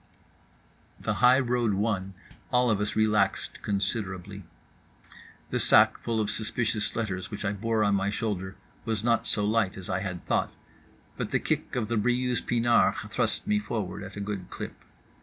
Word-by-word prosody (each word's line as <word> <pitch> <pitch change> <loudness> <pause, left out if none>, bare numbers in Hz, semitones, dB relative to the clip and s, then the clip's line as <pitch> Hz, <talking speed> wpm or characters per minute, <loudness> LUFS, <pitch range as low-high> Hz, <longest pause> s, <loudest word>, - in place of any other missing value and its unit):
The - - -1
highroad 125 -3 +4
won, 95 -2 -1 0.4
all 125 -2 +3
of 105 -1 +1
us 105 - -1
relaxed 105 -3 +1
considerably. 100 -1 -2 1.1
The - - 0
sac - - +6
full 115 -1 -1
of 105 -1 0
suspicious 110 0 -1
letters 95 -5 -3
which 105 0 -5
I 100 - +1
bore 110 +2 0
on 100 -1 +3
my 100 0 +1
shoulder 100 -3 -3 0.3
was 110 -2 -2
not 115 -1 +2
so 105 - +3
light 105 -3 +1
as 95 -1 -5
I 90 - 0
had 90 -3 -5
thought, - - 0 0.7
but - - -3
the - - +2
kick - - -2
of 115 -4 -1
the 115 +1 0
Briouse 125 +2 +1
pinard 120 0 +3 0.2
thrust 120 - 0
me 210 0 +2
forward 110 - -4
at 100 -1 -8
a - - -3
good 100 -3 -4
clip. - - -6
105 Hz, 165 wpm, -28 LUFS, 100-115 Hz, 1.1 s, sac